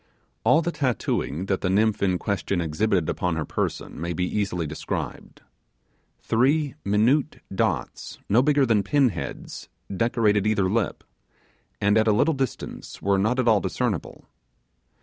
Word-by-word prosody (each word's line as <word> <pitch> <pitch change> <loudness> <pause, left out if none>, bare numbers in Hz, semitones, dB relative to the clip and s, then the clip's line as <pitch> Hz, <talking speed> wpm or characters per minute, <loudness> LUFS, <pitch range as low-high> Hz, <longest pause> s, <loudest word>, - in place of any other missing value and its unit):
All 160 - +4
the 170 - -1
tattooing 120 - -1
that 95 -1 -1
the 90 - 0
nymph 105 +3 +2
in 95 -2 +2
question 100 -1 -2
exhibited 85 +2 0
upon 90 -3 -1
her 80 -2 -2
person - - -3
may 85 +1 -2
be 90 +2 -1
easily 90 -4 -1
described. 75 0 -5 0.8
Three 140 +5 +2
minute 120 +9 +2 0.2
dots, - - -2
no 115 +5 +4
bigger 145 0 +3
than 115 -4 +3
pin 135 +6 +3
heads, 80 -9 -7 0.3
decorated 105 -2 +2
each 110 - +1
lip, 100 +3 0 0.8
and 105 +2 +3
at 110 - +2
a 110 - +5
little 150 +10 +3
distance 135 -3 -5
were 100 0 +1
not 110 +6 +1
at 130 -2 +1
all 110 -3 +5
discernible. - - -3
105 Hz, 150 wpm, -25 LUFS, 95-125 Hz, 0.8 s, a